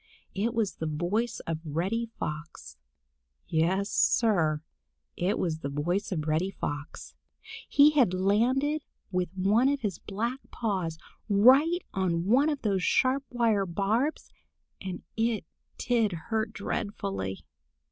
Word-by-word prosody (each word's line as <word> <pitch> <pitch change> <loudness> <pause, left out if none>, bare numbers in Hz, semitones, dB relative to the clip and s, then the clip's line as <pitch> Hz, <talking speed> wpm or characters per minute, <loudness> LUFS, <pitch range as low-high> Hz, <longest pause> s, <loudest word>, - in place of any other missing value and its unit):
It 225 +4 -1
was 220 -4 0
the 160 - -3
voice 175 +10 -1
of 165 -1 -3
Reddy 185 +10 -1
Fox. 150 - -6 0.7
Yes, 185 +5 +1
Sir, 160 -9 +2 0.5
it 185 +5 0
was 160 -3 -1
the 140 - -4
voice 175 +9 -1
of 155 -5 -2
Reddy 160 +5 +1
Fox. 145 -6 -6 0.6
He 290 +1 +7
had 265 -11 +4
landed 240 +11 +2 0.3
with 180 -2 0
one 210 +8 +3
of 285 -1 -1
his 205 -5 -2
black 235 +6 -3
paws 185 -8 -2 0.3
right 270 - +5
on 175 -3 0
one 260 +9 +4
of 290 -3 -3
those 195 -4 +1
sharp 265 +7 +2
wire 225 -5 +1
barbs, 215 - -1 0.5
and 185 -2 -6
it 225 -4 0 0.3
did 230 -5 +1
hurt 220 +6 -2
dreadfully. 95 - -4
200 Hz, 125 wpm, -28 LUFS, 170-235 Hz, 0.7 s, He